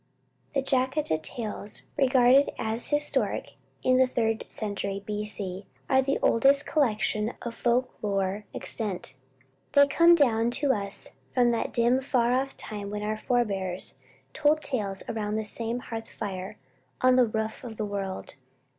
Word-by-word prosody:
The 275 - +2
Jataka 260 - +1
tales, 210 +3 -5
regarded 260 0 +5
as 220 +2 -2
historic 295 0 -1 0.3
in 255 0 +4
the 260 0 +5
Third 225 -3 0
Century 200 -2 -3
B. 210 0 -3
C., 195 -2 -6 0.2
are 265 0 +4
the 275 +1 0
oldest 275 +4 +4
collection 220 -5 +1
of 235 - -4
folk 245 +2 +1
lore 200 0 -1
extant. 200 - -4 0.6
They 285 0 +7
come 335 +5 +6
down 235 -7 +3
to 285 -2 +2
us 200 -3 -2 0.3
from 245 -2 +4
that 230 - -1
dim 240 +2 +3
far 250 -3 +2
off 270 +1 -1
time 205 -2 -6
when 210 0 -4
our 215 +1 -1
forebears 195 - -1 0.3
told 300 +1 +3
tales 205 -8 -2
around 210 -1 -2
the 220 - -1
same 230 +2 -1
hearth 225 -2 -6
fire 190 -2 -6 0.4
on 255 0 +5
the 250 -2 +5
roof 220 +2 -3
of 225 -3 -8
the 215 - -1
world. 195 -2 -4
230 Hz, 150 wpm, -27 LUFS, 210-260 Hz, 0.6 s, They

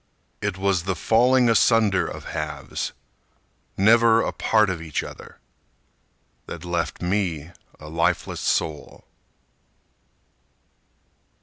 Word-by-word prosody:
It 100 -2 -2
was 95 -3 0
the 95 -1 -1
falling 125 +7 +3
asunder 115 -4 +3
of - - -8
halves, - - -4 0.9
Never 115 +2 +5
a - - -2
part 110 -3 +2
of 85 -3 -5
each 80 -3 -3
other, - - -11 1.1
That 85 +1 -8
left 85 -4 -3
me 90 -4 -1 0.3
a 75 - -11
lifeless 80 +2 -1
soul. 75 -3 -2
95 Hz, 100 wpm, -23 LUFS, 85-110 Hz, 1.1 s, Never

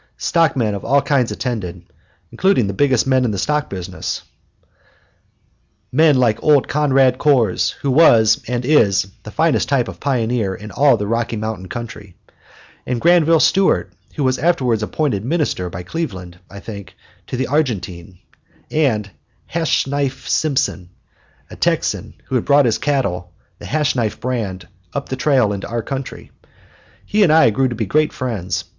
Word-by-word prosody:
Stockmen 135 -10 +1
of 100 - -5
all 140 0 +2
kinds 130 -5 +1
attended, 100 -8 -4 0.5
including 190 - +2
the 100 - -3
biggest 130 +1 +2
men 130 -1 +2
in 120 - +1
the 100 - -3
stock 150 +9 -1
business, 90 -1 -5 1.7
men 155 -3 +4
like 115 -4 +2
old 150 -3 +4
Conrad 135 -3 +2
Kohrs, 125 -10 +2
who 140 - 0
was 115 -7 +5
and 120 0 -2
is 115 -11 +3 0.2
the 105 - -10
finest 130 - +1
type 130 -3 +1
of - - -9
pioneer 120 -7 -1
in 105 +1 -10
all 140 -4 +4
the 105 - -3
Rocky 115 +2 -1
Mountain 110 -4 -5
country; 115 -6 -8 0.7
and 125 -1 -2
Granville 165 +1 +4
Stewart, 185 - +2 0.2
who 145 - -2
was 130 -1 +1
afterwards 130 -8 +1
appointed 105 -2 -1
Minister 130 - -1
by 85 +1 -7
Cleveland, 90 - -6
I 100 - -10
think 100 -3 -9 0.3
to - - -4
the 130 - 0
Argentine; 95 - -2 0.5
and 110 -10 0 0.4
"Hashknife" 140 -5 -1
Simpson, 130 - 0 0.6
a - - -8
Texan - - -1
who - - -9
had 125 - +1
brought 145 -1 +4
his 115 -3 +1
cattle, 95 -12 -1 0.3
the - - -9
Hashknife 135 -7 -1
brand, 100 -8 -4 0.3
up 140 - -4
the 130 - -2
trail 130 -5 +2
into 100 - -5
our 115 0 -3
country. 135 +1 -6 0.7
He 210 - +1
and 180 -6 +5
I 155 -8 +5
grew 130 +5 +1
to 120 - -4
be 110 0 -2
great 155 +9 +1
friends. 100 -9 -3
125 Hz, 155 wpm, -19 LUFS, 105-145 Hz, 1.7 s, was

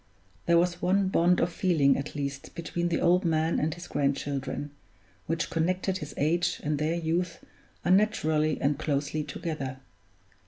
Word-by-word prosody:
There 170 - +5
was 175 0 +1
one 190 +2 +2
bond 180 -1 +3
of 170 0 0
feeling 160 -9 +3
at 140 +3 -5
least 140 -1 -5
between 170 +1 -2
the 170 - 0
old 180 +2 +4
man 160 -1 +1
and 155 +2 0
his 175 +3 -8
grandchildren, 140 0 -2 0.6
which 165 0 -1
connected 185 +3 0
his 150 -1 -7
age 170 +4 +1
and 150 -1 -1
their 155 +2 0
youth 170 +1 -1 0.5
unnaturally 160 -6 +2
and 140 +1 +1
closely 150 0 -1
together. 140 -3 -4
160 Hz, 150 wpm, -28 LUFS, 145-175 Hz, 0.6 s, There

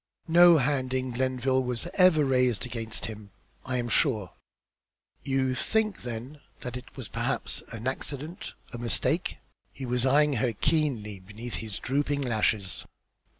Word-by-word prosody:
No 170 0 +8
hand 130 -2 0
in 130 0 -1
Glenville 130 +1 +1
was 125 +1 -3
ever 180 -5 +5
raised 125 -4 +2
against 115 -2 -3
him, 105 -2 -8 0.4
I 130 -1 0
am 120 -1 -1
sure." 110 - +2 0.9
"You 135 -1 0
think 215 +10 0
then 125 +5 -6 0.2
that 125 0 -5
it 125 - -10
was - - -6
perhaps - - -2
an 115 0 -7
accident, 145 +5 -4 0.2
a 120 - -5
mistake?" 120 -1 0 0.3
He 135 - -7
was 125 0 0
eyeing 145 +2 +4
her 125 -3 +1
keenly 125 -7 0
from 95 - -20
beneath 115 +4 -6
his 110 -4 -5
drooping 145 +2 0
lashes. 110 -5 +1
130 Hz, 150 wpm, -28 LUFS, 115-140 Hz, 0.9 s, No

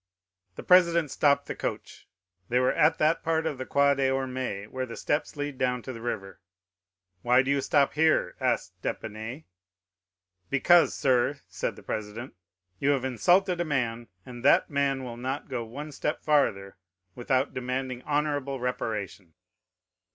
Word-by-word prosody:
The - - -8
president 170 -4 +4
stopped 140 -1 +2
the - - -4
coach. - - -6 0.4
They 125 - +2
were 125 - +2
at 155 +2 +3
that 155 +2 +2
part 160 -1 0
of 150 -5 -3
the 130 - -5
Quai 140 0 +4
des 135 -1 +1
Ormes 130 -6 -3
where 130 0 -3
the 115 - -8
steps 145 +2 -1
lead 145 -2 -4
down 125 -2 0
to 130 - -6
the 115 - -9
river. 95 -5 -5 0.8
"Why 125 +2 +4
do 135 - -1
you 140 -1 +2
stop 140 0 +2
here?" 160 +1 +2
asked - - -1
d'Épinay. 110 +7 -5 1.1
"'"Because, 170 +5 +4
sir," 135 +2 +1
said - - -3
the - - -14
president, 110 +4 -5 0.5
"you 140 - +1
have 135 -3 +1
insulted 175 - +2
a - - +2
man, 120 -6 -2 0.2
and 120 -1 -10
that - - +4
man 140 -2 0
will 120 -2 -7
not 130 +4 -4
go 120 -2 -3
one 140 +7 -8
step 150 +2 -3
farther 105 -11 +1 0.4
without 130 +4 0
demanding 130 0 -3
honorable 145 -2 -1
reparation." 105 -8 -4
130 Hz, 160 wpm, -27 LUFS, 120-145 Hz, 1.1 s, president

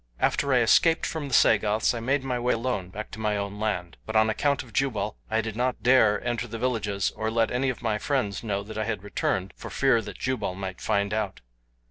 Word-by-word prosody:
"After 140 - +1
I 125 -2 +5
escaped 160 +8 +4
from 155 -3 -3
the 135 - -7
Sagoths 105 +1 +4
I 120 - -3
made 135 +4 0
my 125 -2 -1
way 125 +1 +1
alone 115 -6 -2
back 105 +3 -7
to 110 - -8
my 105 -1 0
own 100 0 -4
land; 90 -5 -2
but 110 - -4
on 110 0 +4
account 140 +4 0
of 120 - -16
Jubal 120 -6 0
I 110 0 +1
did 110 -1 -5
not 125 +2 -1
dare 120 -5 +5
enter 120 0 -1
the 115 0 -6
villages 105 -5 -1
or 110 - -2
let 115 0 +1
any 130 +2 +1
of 125 - -5
my 110 -2 0
friends 125 -9 -1
know 100 -3 -2
that 110 +1 -7
I 110 - 0
had 110 -4 -3
returned 95 -2 -2
for - - -8
fear 135 -4 +3
that - - -8
Jubal 130 -8 -2
might 95 -1 -6
find 100 -1 0
out. 110 0 -2
110 Hz, 230 wpm, -26 LUFS, 105-125 Hz, -, I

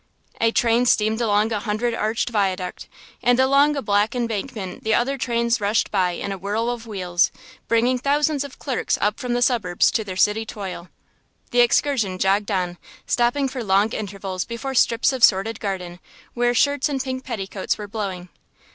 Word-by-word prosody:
A 230 - +4
train 235 +1 +2
steamed 220 0 +2
along 215 0 +2
a 215 - 0
hundred 220 +2 -1
arched 220 +2 -1
viaduct; 190 -4 -2 0.3
and 245 +1 +3
along 280 +3 +4
a 280 - -3
black 205 +2 +1
embankment 225 -4 -4
the 220 0 +2
other 270 +3 +1
trains 235 -2 0
rushed 205 +2 +1
by 185 -3 +1
in 200 - -4
a 195 - -5
whirl 215 +5 -1
of 235 -1 -7
wheels, 180 -4 +1 0.4
bringing 240 +2 +2
thousands 290 +2 +1
of 280 -2 -10
clerks 265 -5 -1
up 210 +1 0
from 250 -1 -2
the 245 - +2
suburbs 205 -9 +2
to 220 - 0
their 185 -3 -6
city 210 +4 +2
toil. 190 -5 -7 0.6
The 245 - +4
excursion 240 -5 +2
jogged 200 +3 +1
on, 180 -3 -2 0.3
stopping 245 +3 +1
for 255 -2 -5
long 200 +2 +2
intervals 195 -3 -4
before 235 +3 -5
strips 235 +1 +3
of 255 -3 -3
sordid 205 +3 +4
garden 180 -3 -4 0.3
where 240 0 +1
shirts 285 +3 +2
and 275 -2 -2
pink 260 0 -4
petticoats 200 -6 -3
were 210 - -7
blowing. 195 -4 -5
225 Hz, 175 wpm, -22 LUFS, 195-245 Hz, 0.6 s, A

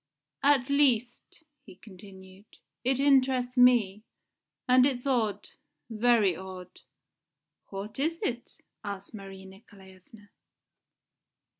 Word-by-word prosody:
"At 275 -3 +3
least," 270 0 0 0.2
he - - -15
continued, 190 0 -16 0.3
"it 260 +1 0
interests 260 -2 +2
me. 240 -6 +3 0.7
And 255 0 +5
it's 260 -2 -1
odd 235 -7 -1 0.4
very 220 -4 +2
odd." 185 0 -11 0.9
"What 200 +5 -8
is 325 +4 -1
it?" 240 -1 -5 0.3
asked 200 0 -7
Marie 195 -2 -10
Nikolaevna. 190 +1 -17
220 Hz, 95 wpm, -28 LUFS, 195-255 Hz, 0.9 s, And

